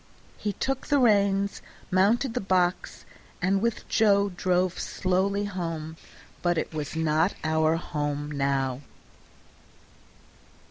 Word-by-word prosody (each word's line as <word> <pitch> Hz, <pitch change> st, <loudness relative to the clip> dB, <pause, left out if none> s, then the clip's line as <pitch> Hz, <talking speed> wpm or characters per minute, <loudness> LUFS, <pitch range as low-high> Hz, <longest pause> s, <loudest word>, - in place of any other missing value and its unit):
He 205 Hz, -1 st, -2 dB
took 270 Hz, +6 st, -3 dB
the 285 Hz, -, +3 dB
reins, 200 Hz, -5 st, +2 dB, 0.3 s
mounted 220 Hz, +7 st, +3 dB
the -, -, -1 dB
box, 185 Hz, -2 st, 0 dB, 0.3 s
and 195 Hz, +2 st, +1 dB
with 235 Hz, 0 st, -1 dB
Joe 200 Hz, -2 st, +3 dB
drove 180 Hz, 0 st, 0 dB
slowly 195 Hz, +2 st, 0 dB
home; 165 Hz, -5 st, -4 dB, 0.5 s
but 175 Hz, -1 st, +1 dB
it 160 Hz, -, -2 dB
was 150 Hz, -1 st, -4 dB
not 160 Hz, 0 st, +1 dB
our 160 Hz, 0 st, +2 dB
home 145 Hz, -3 st, -3 dB
now. 135 Hz, -2 st, -1 dB
180 Hz, 110 wpm, -26 LUFS, 155-200 Hz, 0.5 s, the